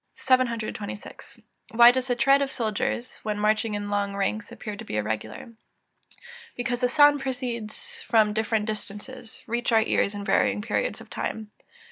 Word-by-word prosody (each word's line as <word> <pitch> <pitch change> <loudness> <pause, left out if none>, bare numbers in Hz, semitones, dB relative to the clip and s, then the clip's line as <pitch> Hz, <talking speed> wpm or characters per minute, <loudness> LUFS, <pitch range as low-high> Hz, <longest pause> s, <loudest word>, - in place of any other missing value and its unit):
] - - -46
726. 230 -5 -2 0.3
Why 240 +1 +9
does 260 +1 -2
the 245 - +1
tread 275 +3 +4
of 280 - 0
soldiers, 235 0 -2
when 210 -1 -3
marching 215 +1 +1
in 205 0 -4
long 200 -1 -1
ranks, 205 +2 -2
appear 215 -3 -6
to - - -8
be 105 - -4
irregular? 110 - -4 1.0
Because 245 0 -2
the 250 - +4
sounds 290 +1 +5
proceeding 245 -4 -3 0.4
from 215 -2 +4
different 220 0 0
distances, 220 +3 -7
reach 240 +2 -1
our 225 -1 +5
ears 205 -2 +1
in 200 0 -5
varying 205 +1 +2
periods - - -1
of - - -15
time. 215 -1 -4
220 Hz, 160 wpm, -26 LUFS, 210-245 Hz, 1.0 s, Why